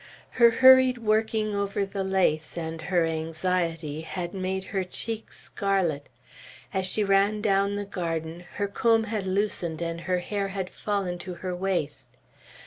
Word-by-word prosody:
Her 235 -1 +6
hurried 260 +1 +7
working 215 -1 +1
over 200 0 -1
the 195 0 -4
lace, 180 -5 +1
and 160 -1 -4
her 175 -1 +1
anxiety, 165 -1 -2
had 175 +2 -5
made 190 0 -2
her 190 -1 +1
cheeks 225 +4 -6
scarlet. 190 -8 -1 0.6
As 190 -1 +1
she 210 +3 +1
ran 200 +1 +3
down 200 -1 +2
the 205 0 -3
garden, 170 -3 -4
her 205 - -1
comb 225 +3 +2
had 215 -3 -3
loosened 185 -4 -1
and 170 0 -3
her 180 0 0
hair 200 +2 -2 0.2
fallen 195 -4 -2
to 180 0 -6
her 180 -1 -2
waist. 155 -9 -2
190 Hz, 145 wpm, -26 LUFS, 170-205 Hz, 0.6 s, hurried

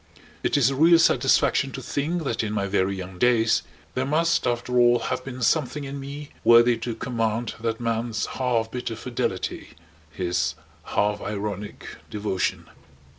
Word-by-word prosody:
It - - +1
is 135 -2 +4
a - - -2
real 165 +4 +6
satisfaction 165 - +3
to - - -5
think 160 +4 -2
that 115 -5 -1
in 105 -1 -2
my 100 -2 0
very 100 0 0
young 90 0 -8
days 115 -2 +3 0.3
there 130 - 0
must, 155 +1 +1
after 120 +1 -1
all, 120 0 +6
have 130 +2 -3
been 125 -1 -6
something 145 +1 +1
in 140 0 -6
me 140 +2 -8
worthy 120 +1 +6
to 115 0 -4
command 115 -1 -2
that 115 -1 -2
man's 115 -1 -1
half 115 -3 -1
bitter 125 -2 -4
fidelity, 120 +2 -4 0.3
his 90 +3 -1 0.3
half 105 0 0
ironic 105 0 -5 0.2
devotion. 105 -3 -2
120 Hz, 155 wpm, -25 LUFS, 110-130 Hz, 0.3 s, real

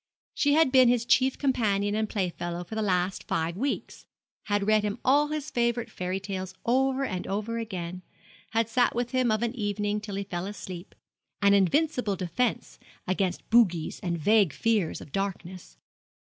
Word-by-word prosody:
She 290 -1 +2
had 315 -3 +4
been 255 -2 +6
his 240 -1 +2
chief 260 +1 +3
companion 205 -7 +1
and 215 0 -1
playfellow 175 -3 -3
for 175 - -10
the 220 - -1
last 185 -2 0
five 165 +1 -1
weeks, 270 +9 -4 0.4
had 205 -1 0
read 215 0 +4
him 205 -1 -2
all 290 +3 +4
his 305 0 -4
favourite 235 -1 0
fairy 180 +1 -3
tales 190 -1 -5
over 265 +2 +2
and 185 -7 -4
over 215 +4 -2
again, 185 -5 -5 0.5
had 225 0 +1
sat 245 +1 +2
with 240 0 -1
him 255 -2 +2
of 215 +2 +1
an 235 +1 -1
evening 205 -1 -1
till 205 -1 -6
he 200 - -2
fell 180 -1 -4
asleep, 185 -2 -8 0.5
an 200 0 +6
invincible 235 - +2
defence 190 +6 -2 0.3
against 185 -1 -1
bogies 185 -9 +3
and 175 -2 -2
vague 200 -1 +3
fears 215 -7 0
of 145 - -12
darkness. 185 - -5
210 Hz, 170 wpm, -27 LUFS, 185-240 Hz, 0.5 s, been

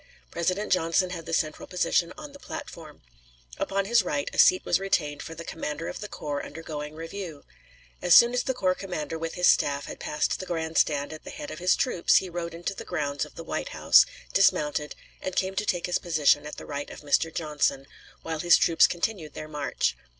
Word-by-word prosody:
President 185 +5 -1
Johnson 180 +1 +1
had 165 -3 -6
the - - -5
central 155 -2 -1
position 180 -1 +1
on 300 -2 -9
the 285 - -13
platform. 155 - -9 0.6
Upon 195 0 0
his 230 +2 +4
right, 145 -6 -2
a - - -3
seat 185 - +6
was 175 - +2
retained 155 -7 -1
for 165 - -8
the 170 - -7
commander 160 0 -5
of - - -5
the 210 - -6
corps 145 -6 -4
undergoing 150 -1 -7
review. 165 -1 -7 0.6
As 175 - +6
soon 235 +1 +8
as 250 - +2
the 260 - -2
corps 185 -6 +2
commander 165 -5 -5
with 165 0 -4
his 180 -1 +1
staff 140 0 +3
had - - -8
passed 150 - -1
the 185 - -6
grand 160 -1 -1
stand 145 0 +1
at 155 - -10
the - - -9
head 290 +1 -7
of - - -7
his 180 +1 +3
troops, 185 -10 +2
he 185 -2 +3
rode 170 -1 -4
into 175 +3 -3
the - - -8
grounds 145 -1 -2
of - - -16
the - - -7
White - - -4
House, - - +6 0.3
dismounted, 150 -6 +2 0.3
and 185 - -4
came 190 0 0
to 210 +2 -2
take 175 -2 0
his 180 - 0
position 150 -3 +2
at - - -8
the - - -8
right 145 0 -5
of - - -10
Mr. 150 +2 +1
Johnson, 150 -4 -1 0.4
while 160 -1 -3
his 175 +2 +6
troops 165 -1 +5
continued 175 -3 -3
their 155 - -6
march. 150 -2 -1
165 Hz, 215 wpm, -27 LUFS, 150-185 Hz, 0.6 s, soon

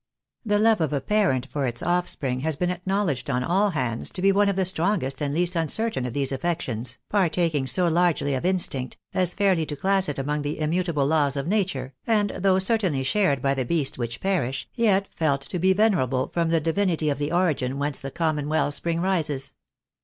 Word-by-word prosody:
The 210 -3 +1
love 220 -2 +3
of 155 - 0
a 140 - +1
parent 155 -5 +1
for 140 -1 -1
its 120 -1 -4
offspring 165 -7 0
has 155 +3 -1
been 180 +4 0
acknow 190 +3 -1
ledged 140 -5 -2
on 125 -2 0
all 195 +7 +2
hands 125 -9 -2
to 180 - -3
be 195 - +5
one 200 +1 +3
of 200 - 0
the 190 -1 +1
strongest 175 -7 -1
and 145 -1 -1
least 175 +4 0
uncertain 165 - 0
of 120 - -6
these 140 0 0
affections, 135 -6 -3
partaking 170 -7 +1
so 175 +8 +2
largely 165 -4 +2
of 130 - -2
instinct, 170 -8 -1 0.2
as 180 -1 +1
fairly 195 -5 +2
to 145 - -4
class 195 +3 +1
it 145 - -4
among 150 +2 -1
the 145 +1 -4
immutable 160 -2 0
laws 145 -2 +1
of 140 - -2
nature, 175 -10 -1
and 210 -3 +2
though 190 0 +2
certainly 190 - +1
shared 140 -3 +1
by 135 0 +2
the 135 -1 -1
beasts 145 +2 -1
which 115 -1 -4
perish, 135 -10 -1
yet 200 -5 +2
felt 140 -4 0
to 175 +6 -5
be 190 +2 +3
venerable 175 - +2
from 170 -1 +1
the 165 0 +3
divinity 165 -1 0
of 140 - -3
the 145 +1 -2
origin 155 -7 +1
whence 145 0 -2
the 135 - -5
common 150 0 -1
well 155 -2 +1
spring 165 +3 -2
rises. 155 -7 -1
160 Hz, 205 wpm, -25 LUFS, 140-185 Hz, 0.2 s, be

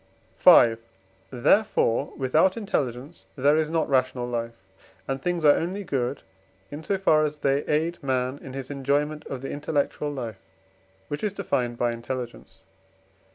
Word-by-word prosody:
V. 115 -1 +7 0.5
Therefore, 135 - +2
without 155 - +2
intelligence 145 - -3
there 145 +2 +3
is 155 -1 +1
not 165 -1 0
rational 130 -3 0
life: 115 -3 -5 0.4
and 135 0 -3
things 175 -1 -1
are 145 - +8
only 185 +6 -2
good, 135 -5 -2 0.5
in 150 +2 -7
so 195 +5 0
far 155 -5 +3
as 150 0 -2
they 140 0 +1
aid 160 +3 -1
man 130 0 -1
in 130 - -10
his 135 0 -6
enjoyment 145 +2 -1
of 130 -2 -5
the 135 - -5
intellectual 145 0 -2
life, 115 -7 -6 0.7
which 145 - -5
is 210 -2 -1
defined 125 -12 -2
by 120 0 +1
intelligence. 120 +1 -7
140 Hz, 150 wpm, -25 LUFS, 125-155 Hz, 0.7 s, are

